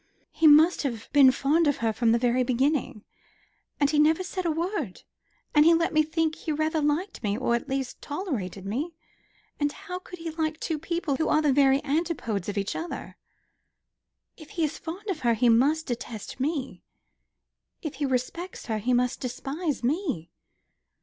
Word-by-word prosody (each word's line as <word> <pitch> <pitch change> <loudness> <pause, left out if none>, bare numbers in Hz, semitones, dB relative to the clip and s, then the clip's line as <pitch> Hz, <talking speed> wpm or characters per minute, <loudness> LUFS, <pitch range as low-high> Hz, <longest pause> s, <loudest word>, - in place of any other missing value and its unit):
"He 320 - +3
must 310 +4 +6
have 235 -6 -4
been 280 -2 +8
fond 295 +5 +2
of 290 - +2
her 225 -1 0
from 230 +1 +2
the 230 - +4
very 245 +1 +2
beginning; 260 -1 0 0.8
and 285 - +4
he 300 - +2
never 315 +4 +4
said 370 -1 -3
a - - +2
word; 325 - -3 0.5
and 295 - +6
he 335 +1 +6
let 335 0 +1
me 310 - +5
think 315 +1 0
he 315 - -5
rather 310 +1 0
liked 300 +7 -1
me 205 -2 -1
or 250 -1 0
at 235 +4 -2
least 265 -1 -3
tolerated 255 - -4
me. 285 - -3 0.6
And 290 -1 +1
how 360 +3 -7
could 365 0 -11
he 330 -1 -5
like 315 0 -2
two 315 -2 -2
people 330 -3 -2
who 315 - 0
are 305 - +4
the 290 -3 +3
very 275 +1 +4
antipodes 280 - -1
of 205 - -4
each 200 0 -2
other? 335 +1 -6 1.2
If 310 -3 -13
he 330 - +2
is 305 0 -2
fond 360 +6 -7
of 375 -6 -2
her, 235 -3 +2
he 240 +2 +3
must 285 +8 +3
detest 240 -2 -6
me. 275 -1 -2 1.0
If 310 - -4
he 290 - 0
respects 265 +8 -3
her, 220 -2 -2
he 245 +4 0
must 250 0 +1
despise 275 +4 -3
me." 260 - -1
290 Hz, 185 wpm, -27 LUFS, 250-325 Hz, 1.2 s, been